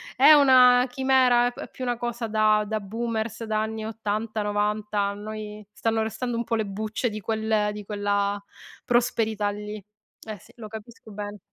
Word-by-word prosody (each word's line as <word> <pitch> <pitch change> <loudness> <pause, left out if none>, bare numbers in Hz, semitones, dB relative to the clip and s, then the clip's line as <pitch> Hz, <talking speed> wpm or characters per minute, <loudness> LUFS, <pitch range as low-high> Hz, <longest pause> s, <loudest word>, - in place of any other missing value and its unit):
è 310 - +7
una 255 -3 +7
chimera, 250 -2 +3
è - - -8
più 260 - -8
una 245 -1 -1
cosa 240 -1 -3
da 215 -1 +3
da 220 0 -1
boomers, 225 +2 -4
da 215 0 0
anni 220 0 -4
80'-90', 210 -1 -2
a 200 0 0
noi 210 0 -7
stanno 225 +2 0
restando 235 +2 -3
un 235 - -1
po' 230 - -5
le 220 -1 0
bucce 215 +4 -2
di 215 - -6
quel 220 -1 0
di 210 0 -7
quella 205 0 -1 0.5
prosperità 225 -4 +1
lì. 210 0 -7 0.4
Eh 215 -1 -6
sì, - - -20
lo 220 -2 -8
capisco 220 0 -11
bene. 205 0 -6
220 Hz, 165 wpm, -25 LUFS, 210-235 Hz, 0.5 s, è